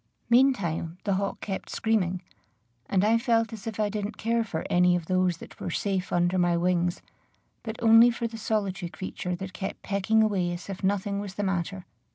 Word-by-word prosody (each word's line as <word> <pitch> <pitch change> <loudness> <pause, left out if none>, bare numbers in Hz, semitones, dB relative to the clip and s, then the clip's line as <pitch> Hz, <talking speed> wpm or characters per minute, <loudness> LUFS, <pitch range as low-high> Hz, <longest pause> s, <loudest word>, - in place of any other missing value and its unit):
Meantime 195 -10 +2
the 200 - +1
hawk 195 +1 -2
kept 195 -2 -4
screaming; 185 -5 0 0.6
and 190 -1 +2
I 225 +2 +4
felt 230 -1 +1
as 220 -1 -8
if 220 -1 -5
I 210 - +2
didn't 210 +1 -4
care 230 +1 +1
for 170 -7 -4
any 180 0 +4
of 175 -2 -2
those 185 -1 +1
that - - -13
were - - -4
safe 190 +1 -2
under 175 +1 +2
my 175 -1 +3
wings, 175 0 0 0.6
but 220 -1 -5
only 225 +1 +8
for 235 0 -3
the 230 0 -4
solitary 200 -4 -1
creature 180 0 -4
that 185 +1 -7
kept 190 - -5
pecking 205 +3 +2
away 185 -5 0
as 175 +3 -8
if 190 - -8
nothing 200 +1 0
was 200 -2 -6
the 205 - -2
matter. 190 -1 -2
195 Hz, 195 wpm, -27 LUFS, 180-220 Hz, 0.6 s, only